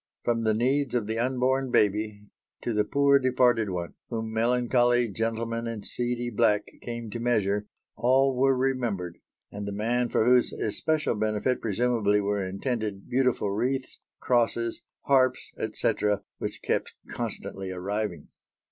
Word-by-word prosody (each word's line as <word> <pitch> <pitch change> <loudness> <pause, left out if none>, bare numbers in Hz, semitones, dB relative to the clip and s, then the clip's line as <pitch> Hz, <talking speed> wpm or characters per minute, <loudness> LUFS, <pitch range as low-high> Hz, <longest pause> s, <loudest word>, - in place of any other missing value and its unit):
From 115 -1 0
the 110 -1 +3
needs 130 +4 +1
of 115 -4 +1
the 110 +2 -2
unborn 130 +2 +1
baby, 105 -1 +1 0.4
to 120 - -1
the 105 0 +2
"poor 140 +3 +4
departed 125 -4 +3
one," 90 -2 -4 0.2
whom 110 -1 -3
melancholy 120 +1 +2
gentlemen 115 +2 -2
in 115 -3 -5
seedy 120 +1 -2
black 105 -2 +2 0.2
came 120 -2 -6
to 120 - -4
measure, 105 -4 +1 0.3
all 130 +2 +3
were 135 +1 +3
remembered, 120 -10 -1 0.3
and 100 0 -6
the - - -3
man 120 +4 0
for 110 - +2
whose 125 0 +4
especial 155 +8 0
benefit 110 +3 0
presumably 110 -1 +1
were 100 0 0
intended 100 +1 -3
beautiful 125 -5 +1
wreaths, 130 +6 -2 0.2
crosses, 115 -1 +1 0.2
harps, 130 -2 +2
etc., 105 -1 0 0.2
which - - -4
kept - - -1
constantly 95 -1 -5
arriving. 95 +1 -3
115 Hz, 140 wpm, -27 LUFS, 105-125 Hz, 0.4 s, poor